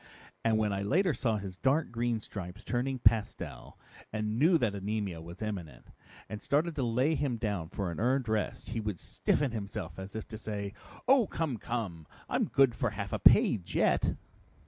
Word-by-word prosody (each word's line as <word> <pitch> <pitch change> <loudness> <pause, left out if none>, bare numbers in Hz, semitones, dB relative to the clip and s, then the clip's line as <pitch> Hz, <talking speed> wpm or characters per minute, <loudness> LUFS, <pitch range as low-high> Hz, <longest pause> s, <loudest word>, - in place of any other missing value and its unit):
And 115 -1 +3
when 105 -2 +1
I 100 - -1
later 175 - +2
saw 115 -5 0
his 95 -3 -6
dark 140 +8 +2
green 120 -1 0
stripes 95 -1 -7
turning 130 +2 -1
pastel 115 -3 0 0.3
and 110 +1 -1
knew 165 +4 +6
that 120 -8 +1
anemia 100 -3 -3
was 85 +5 -8
imminent, 90 - -6 0.4
and 105 +1 -6
started 150 +4 +1
to 135 - +1
lay 125 +6 +2
him 140 -6 0
down 100 -8 -2
for 95 -2 -3
a - - -5
earned 125 +2 +2
rest, 110 -1 -1
he 115 - -1
would 105 -5 -3
stiffen 145 -4 0
himself 100 -6 -5
as 95 +2 -8
if 110 - -5
to 110 -2 -7
say, 100 -3 -4 0.3
'Oh, 255 -5 +6
come, 155 -7 -2
come! 100 -9 -4 0.2
I'm - - +1
good 135 -3 +4
for 115 +1 0
half 100 -1 -5
a - - 0
page 90 -4 +5
yet!'" - - +3
110 Hz, 185 wpm, -31 LUFS, 100-125 Hz, 0.4 s, knew